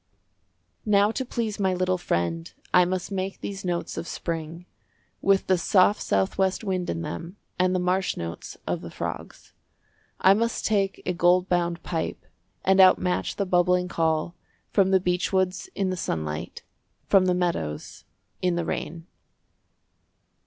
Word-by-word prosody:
Now 205 0 +4
to 260 - -2
please 230 -4 -3
my 190 -2 +1
little 185 0 0
friend 85 - -2 0.2
I 180 -1 +6
must 185 +2 -3
make 190 0 -3
these 195 -1 -6
notes 175 -2 -3
of 165 - -4
spring, 165 +1 -5 0.6
With 195 0 +3
the 185 -2 +2
soft 195 +3 +4
south 95 - 0
west 190 +2 +1
wind 185 -3 -2
in 85 0 -2
them 165 - -6 0.2
And 185 0 +3
the - - +2
marsh 185 +1 0
notes 85 0 -6
of - - -2
the - - -8
frogs. - - -7 0.7
I 190 - +6
must 230 +3 -1
take 200 -2 0
a 180 - 0
gold 180 +1 +3
bound 175 -1 0
pipe, 165 -2 -3 0.4
And 190 0 +6
outmatch 185 -1 +3
the 200 - -1
bubbling 180 0 +2
call 160 0 0 0.4
From 195 -2 +3
the 190 0 +4
beechwoods 185 - 0
in 195 -2 0
the - - -1
sunlight, 80 - -4 0.4
From 190 -2 +4
the 180 - +3
meadows 170 - -3 0.4
in 180 -1 +1
the 170 -1 -1
rain. 165 0 -4
180 Hz, 150 wpm, -25 LUFS, 170-190 Hz, 0.7 s, I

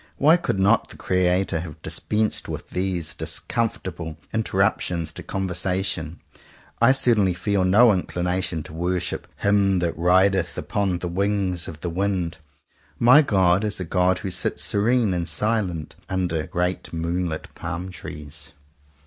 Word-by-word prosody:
Why 155 +4 +6
could 165 - -1
not 100 +2 +3
the - - -12
Creator 90 -1 +1
have 80 -2 -8
dispensed 110 0 -1
with - - -6
these 90 -3 -2
discomfortable 90 -9 -3 0.2
interruptions 95 -5 0
to - - -6
con 95 0 -3
versation? 90 -3 -1 0.7
I 120 +2 +7
certainly 110 -9 +3
feel 100 +1 0
no 105 +5 +6
inclination 90 -2 -2
to 80 - -11
worship 90 +2 -2
"Him 100 -1 +2
that 85 -2 0
rideth 90 +1 +2
upon 100 -3 -1
the 90 - -4
Wings 95 -1 -1
of 80 -2 -9
the 90 - -2
Wind." 90 -3 -1 0.6
My 125 - +7
God 95 - +3
is 105 -2 -2
a 90 - -3
God 90 +2 +2
who 95 - -2
sits - - -2
serene 110 0 +2
and 85 -2 -2
silent, 100 -8 -1
under 90 -4 -1
great 90 +1 -2
moon 85 +2 -1
lit 80 0 -6
palm 85 +3 -5
trees. 75 -4 -9
90 Hz, 145 wpm, -23 LUFS, 85-100 Hz, 0.7 s, I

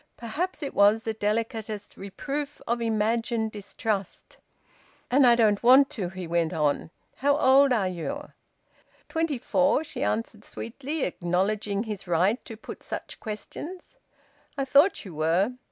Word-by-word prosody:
Perhaps 305 +9 -3
it 280 - -4
was 205 +2 +4
the 225 - -2
delicatest 215 -1 -3
reproof 280 +9 -5
of 235 0 -1
imagined 225 0 0
distrust. 205 -1 -4 0.7
"And 265 0 +6
I 240 - +7
don't 215 -3 +3
want 265 +4 +6
to," 195 -11 -3
he 185 0 -7
went 170 -1 0
on. 150 -1 0 0.3
"How 285 +2 +2
old 275 -1 +5
are 215 -6 +2
you?" 230 - -5 0.8
"Twenty 320 -4 0
four," 275 +4 +2
she 275 -4 -7
answered 220 -5 -2
sweetly, 275 +9 -5
acknowledging 200 +4 -1
his 210 -4 -6
right 180 +8 +2
to 225 - -8
put - - -9
such - - -6
questions. 320 - -7 0.6
"I 275 - 0
thought 285 - +4
you 185 - -8
were." 165 +9 +1
225 Hz, 140 wpm, -27 LUFS, 200-275 Hz, 0.8 s, I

